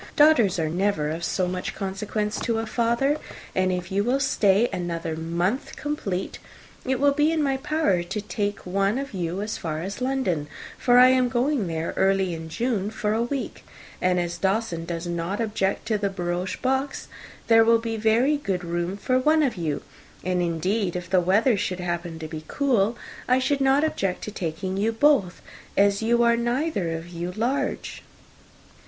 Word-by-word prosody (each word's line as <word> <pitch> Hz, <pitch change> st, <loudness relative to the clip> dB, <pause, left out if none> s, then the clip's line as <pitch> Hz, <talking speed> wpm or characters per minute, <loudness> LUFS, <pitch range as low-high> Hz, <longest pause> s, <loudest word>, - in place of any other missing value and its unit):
Daughters 290 Hz, -, +5 dB
are 160 Hz, -2 st, 0 dB
never 165 Hz, -3 st, 0 dB
of 165 Hz, +2 st, -4 dB
so 185 Hz, -1 st, 0 dB
much 180 Hz, 0 st, -4 dB
consequence 210 Hz, +2 st, -3 dB
to 230 Hz, -2 st, -1 dB
a 225 Hz, -, -1 dB
father. 235 Hz, +6 st, +1 dB, 0.4 s
And 185 Hz, 0 st, +1 dB
if 180 Hz, +1 st, -3 dB
you 200 Hz, +1 st, +1 dB
will 250 Hz, +5 st, +1 dB
stay 220 Hz, -5 st, +3 dB
another 170 Hz, -3 st, -3 dB
month 170 Hz, -, -2 dB
complete, 200 Hz, -11 st, -3 dB, 0.4 s
it 260 Hz, -1 st, -1 dB
will 285 Hz, +1 st, +4 dB
be 295 Hz, +2 st, +2 dB
in 320 Hz, -2 st, +1 dB
my 270 Hz, -1 st, +1 dB
power 295 Hz, -, +1 dB
to 185 Hz, +5 st, -4 dB
take 205 Hz, 0 st, -3 dB
one 195 Hz, +4 st, +1 dB
of 275 Hz, -2 st, -5 dB
you 180 Hz, +1 st, -2 dB
as 215 Hz, -, -4 dB
far 160 Hz, -1 st, -3 dB
as 200 Hz, +6 st, -6 dB
London, 250 Hz, -, 0 dB, 0.3 s
for 245 Hz, -1 st, +3 dB
I 250 Hz, +1 st, +9 dB
am 255 Hz, -1 st, +3 dB
going 250 Hz, -3 st, +1 dB
there 165 Hz, 0 st, -3 dB
early 190 Hz, -2 st, +2 dB
in 160 Hz, 0 st, -6 dB
June, 210 Hz, +2 st, -1 dB
for 210 Hz, -1 st, -1 dB
a 225 Hz, -, +1 dB
week; 260 Hz, +3 st, -3 dB, 0.4 s
and 180 Hz, 0 st, +2 dB
as 175 Hz, 0 st, -3 dB
Dawson 190 Hz, -3 st, 0 dB
does 170 Hz, 0 st, -4 dB
not 175 Hz, +3 st, -3 dB
object 210 Hz, -4 st, -1 dB
to 215 Hz, -2 st, +1 dB
the 200 Hz, -1 st, 0 dB
barouche 180 Hz, -1 st, -3 dB
box, 265 Hz, +1 st, -1 dB, 0.4 s
there 225 Hz, -1 st, +6 dB
will 230 Hz, +1 st, +5 dB
be 230 Hz, 0 st, -3 dB
very 225 Hz, +7 st, +3 dB
good 195 Hz, -10 st, -2 dB
room 175 Hz, +2 st, -2 dB
for 255 Hz, +5 st, +1 dB
one 310 Hz, +4 st, +3 dB
of 265 Hz, -, 0 dB
you 160 Hz, -5 st, -3 dB, 0.4 s
and, 180 Hz, 0 st, 0 dB
indeed, 175 Hz, +3 st, 0 dB
if 180 Hz, 0 st, -5 dB
the 185 Hz, -1 st, +4 dB
weather 210 Hz, +7 st, +3 dB
should 185 Hz, -2 st, -2 dB
happen 175 Hz, -1 st, -3 dB
to 160 Hz, -1 st, -6 dB
be 155 Hz, 0 st, -7 dB
cool, 240 Hz, -5 st, +1 dB, 0.3 s
I 255 Hz, -, +4 dB
should 275 Hz, +2 st, 0 dB
not 270 Hz, +2 st, +4 dB
object 195 Hz, -12 st, -1 dB
to 210 Hz, -, -5 dB
taking 185 Hz, +1 st, -3 dB
you 220 Hz, +3 st, +1 dB
both, 225 Hz, -, +2 dB, 0.3 s
as 200 Hz, +1 st, +4 dB
you 235 Hz, +1 st, +3 dB
are 235 Hz, 0 st, +4 dB
neither 240 Hz, -, -1 dB
of 165 Hz, +1 st, -9 dB
you 175 Hz, +1 st, -4 dB
large." 245 Hz, +7 st, -2 dB
200 Hz, 185 wpm, -25 LUFS, 180-245 Hz, 0.4 s, I